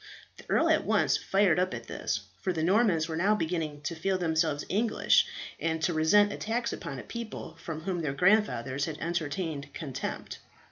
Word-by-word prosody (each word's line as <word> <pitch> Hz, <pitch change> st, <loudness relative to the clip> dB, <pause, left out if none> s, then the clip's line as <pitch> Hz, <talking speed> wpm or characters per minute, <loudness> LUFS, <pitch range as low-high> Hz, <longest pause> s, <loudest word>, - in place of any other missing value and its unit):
The -, -, -15 dB
earl -, -, +3 dB
at -, -, +3 dB
once -, -, +2 dB
fired 195 Hz, -4 st, +2 dB
up 185 Hz, 0 st, 0 dB
at -, -, -7 dB
this, -, -, -3 dB, 0.2 s
for 185 Hz, -, 0 dB
the 160 Hz, -3 st, -2 dB
Normans 185 Hz, -3 st, +3 dB
were 160 Hz, -, -3 dB
now 195 Hz, +6 st, +3 dB
beginning 160 Hz, -5 st, -2 dB
to 150 Hz, +3 st, -3 dB
feel 190 Hz, +4 st, 0 dB
themselves 160 Hz, -4 st, 0 dB
English, 215 Hz, +3 st, +3 dB, 0.3 s
and 160 Hz, -1 st, -1 dB
to 175 Hz, -, +2 dB
resent 200 Hz, +7 st, +4 dB
attacks 235 Hz, +2 st, -2 dB
upon 135 Hz, -, -6 dB
a -, -, -7 dB
people 230 Hz, -8 st, -7 dB
for 165 Hz, -, -5 dB
whom 170 Hz, +2 st, -3 dB
their 150 Hz, -4 st, -1 dB
grandfathers 140 Hz, -, +2 dB
had 155 Hz, -2 st, -5 dB
entertained 160 Hz, -3 st, -3 dB
contempt. 140 Hz, -6 st, -5 dB
165 Hz, 180 wpm, -29 LUFS, 155-195 Hz, 0.3 s, resent